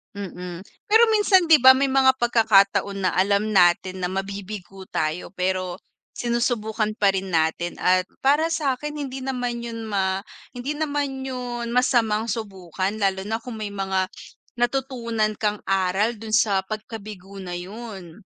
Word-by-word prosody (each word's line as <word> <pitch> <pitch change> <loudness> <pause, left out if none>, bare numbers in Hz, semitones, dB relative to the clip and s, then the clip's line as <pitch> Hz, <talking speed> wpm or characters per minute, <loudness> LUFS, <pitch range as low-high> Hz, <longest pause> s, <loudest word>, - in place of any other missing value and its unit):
Mm. 180 -3 -6 0.3
Pero 445 +2 +7
minsan 405 -4 +4
'di 320 -1 +8
ba? 260 - +11
May 270 +1 +2
mga 265 0 +5
pagkakataon 200 -4 +3
na - - +1
alam 200 +2 +2
natin 185 +1 +3
na 180 - -1
mabibigo 195 0 -6
tayo, 155 +3 -2
pero 185 -1 -2 0.3
sinusubukan 235 -3 -1
pa 195 -1 +3
rin 190 0 -3
natin. 165 +1 0
At 185 0 +3 0.2
para 300 +4 +3
sakin 295 -1 -2
hindi 270 -2 -5
naman 245 -2 -3
yun 230 -1 -6
ma 190 -2 0 0.3
hindi 250 +4 -4
naman 285 -3 -2
yun 245 -2 -4
masamang 230 -3 +2
subukan 195 -2 -3
lalo 190 -2 0
na 220 +3 -2
kung 235 0 -8
may 215 -2 -5
mga 190 -1 -1 0.5
natutunan 240 -4 0
kang 210 -1 -1
aral 195 +4 0
dun 220 0 -1
sa 210 -5 +3
pagkabigo 210 -3 -8
na 180 -2 -6
yun. 190 -1 -8
215 Hz, 145 wpm, -23 LUFS, 190-245 Hz, 0.5 s, ba